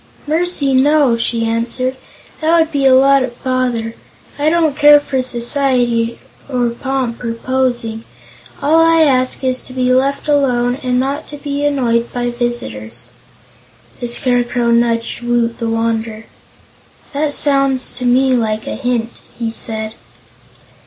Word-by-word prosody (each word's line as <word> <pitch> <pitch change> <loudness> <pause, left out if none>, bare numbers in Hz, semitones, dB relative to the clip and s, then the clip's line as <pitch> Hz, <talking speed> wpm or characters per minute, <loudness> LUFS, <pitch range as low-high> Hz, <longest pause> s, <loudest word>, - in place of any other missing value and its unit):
"Mercy, 310 -3 0
no," 275 -1 +3
she 230 0 0
answered. 235 +3 -2 0.4
"That 325 +2 +2
would 320 0 +1
be 280 -3 +2
a 260 - +6
lot 275 +1 +5
of 245 -2 -5
bother. 250 -3 -1 0.5
I 295 +2 +2
don't 320 -3 +1
care 295 0 +7
for 270 -2 -2
society, 240 -2 0 0.3
or 245 -3 0
pomp, 255 -1 -3
or 230 -1 -3
posing. 240 -3 -2 0.6
All 310 +3 +4
I 330 0 +4
ask 260 -3 +1
is 255 -1 0
to 255 - -11
be 255 -1 +1
left 275 +3 0
alone 255 -3 +1
and 250 -2 0
not 275 +2 -2
to 295 - -8
be 285 0 -4
annoyed 240 -5 0
by 245 0 -2
visitors." 120 - -5 0.9
The 245 - -3
Scarecrow 245 -1 0
nudged 235 0 0
Woot 240 -1 -1
the 230 - -2
Wanderer. 225 -1 -2 0.9
"That 290 +1 +1
sounds 275 -2 +3
to 250 - -7
me 260 +2 +3
like 220 -3 -1
a - - -4
hint," 240 -3 -3 0.2
he 230 -1 -3
said. 220 -1 -4
250 Hz, 145 wpm, -16 LUFS, 235-275 Hz, 0.9 s, care